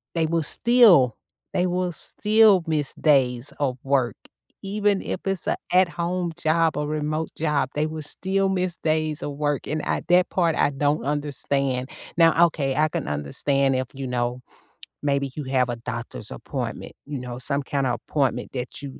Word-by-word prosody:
they 165 -1 +2
will 165 0 0
still 190 - +5 0.4
they 180 +1 +1
will 180 0 -1
still 210 +2 +3
miss 155 -4 -1
days 130 -4 +2
of 130 -3 0
work, 135 -5 +1 0.5
even 205 0 0
if - - -3
it's 195 -2 -1
a - - +2 0.2
at 185 0 +5
home 175 0 -2
job 165 0 +2
or 150 0 -1
remote 155 +1 -2
job, 150 -3 0
they 150 +1 +1
will 155 0 -5
still 190 +6 0
miss 185 -2 0
days 155 -1 0
of 145 - -3
work, 145 -1 -2
and 155 0 -2
at - - -2
that 180 +1 +4
part, 170 -4 +1
I 145 - +2
don't 145 +2 0
understand. 140 -3 -1 0.3
Now, 165 0 +6
okay, 140 -5 -1
I 155 +2 +3
can - - -4
understand 135 - 0
if, 130 0 0
you 135 0 -5
know, 125 0 -2 0.6
maybe 140 -2 0
you 150 - -4
have 130 -1 +1
a 120 - -2
doctor's 120 0 -4
appointment, - - -5
you 145 -2 -5
know, 125 -1 -6
some 140 +2 0
kinda 135 -3 -1
appointment 140 0 -1
that 125 +1 -6
you 140 -2 -8
150 Hz, 175 wpm, -24 LUFS, 135-170 Hz, 0.6 s, Now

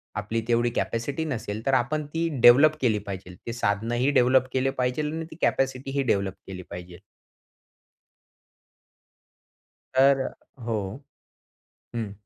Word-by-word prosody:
आपली 110 +3 -2
तेवढी 120 0 +2
कॅपॅसिटी 135 +7 -2
नसेल, 110 -6 -4
तर 135 - +1
आपण 150 +5 +1
ती 165 +2 -1
डेव्हलप 140 +7 +7
केली 110 -5 +2
पाहिजे. 95 -2 -7
ते 115 - -3
साधनंही 120 +4 0
डेव्हलप 130 -1 +4
केले 130 0 +1
पाहिजे 125 +4 0
आणि 160 +2 -3
ती - - -9
कॅपॅसिटीही 135 +1 0
डेव्हलप 100 -5 0
केली 95 -1 -7
पाहिजे. 90 0 -9 2.9
तर 135 +1 +5 0.4
हो 110 -2 -1 1.2
हं. 110 -3 -3
120 Hz, 115 wpm, -26 LUFS, 105-135 Hz, 2.9 s, डेव्हलप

